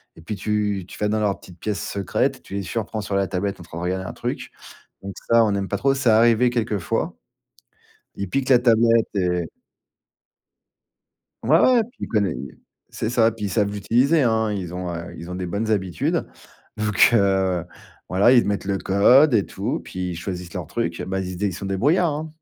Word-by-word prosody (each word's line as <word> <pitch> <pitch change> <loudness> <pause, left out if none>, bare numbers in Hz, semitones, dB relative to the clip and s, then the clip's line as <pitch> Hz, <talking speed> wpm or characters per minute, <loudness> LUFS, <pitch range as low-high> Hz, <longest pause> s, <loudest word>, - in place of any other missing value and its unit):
et - - -14
puis, 105 +6 -5
tu 105 -3 -1
tu - - -11
vas 105 - +1
dans 110 0 0
leur 100 -2 0
petite 90 -2 -15
pièce 105 -5 -3
secrète, 100 -2 -1
tu - - -12
les 100 - -2
surprends 110 +2 -4
sur 100 -1 -3
la 100 -1 +1
tablette 100 +1 -3
en - - -10
train 80 -1 -10
de - - -5
regarder 95 +1 -2
un - - -6
truc. - - -5 0.5
Donc 100 0 -6 0.2
ça, 115 0 +6
on 105 - +1
n'aime 100 -1 -1
pas 100 - -1
trop. 135 +5 +2
C'est 135 -3 +1
arrivé 115 +2 +4
quelques 110 -3 -1
fois. 85 - -2 1.0
Ils 100 -2 -4
piquent 135 +5 -1
la 125 - +7
tablette 115 -1 +4
et 90 -3 0 2.0
Ouais, 155 +8 +5
ouais, 250 -3 +5
puis 240 - -21
il - - -4
connait 100 -6 +1
et 70 - -8 0.3
c'est 110 - -3
ça. 115 -2 +3
Puis, 110 -2 -7
ils - - -2
savent 100 +2 +1
l'utiliser, 125 +9 +2
hein. 110 -2 +1
Ils 90 -4 -4
ont, 90 -1 -4
heu, 85 +1 -7
ils 85 +2 -9
ont - - -4
des 90 0 -4
bonnes 105 +5 -2
habitudes. 95 -5 -1 0.5
Vu 105 0 -1
que 95 -4 +3 0.4
voilà, 100 +6 +4
ils 120 - +5
mettent 100 -1 -2
le 100 -1 0
code 125 +10 +5
et 105 -4 +3
tout. - - -3
Puis 90 -1 -5
ils - - -5
choisissent 90 0 -6
leur - - -5
truc. - - -3
Bah, 95 0 -2
ils 90 0 -5
se - - -7
dé 105 - -1
ils 95 - -3
sont 100 +2 -6
débrouillards, 145 - +2
hein. 155 +2 -4
100 Hz, 215 wpm, -22 LUFS, 95-115 Hz, 2.0 s, la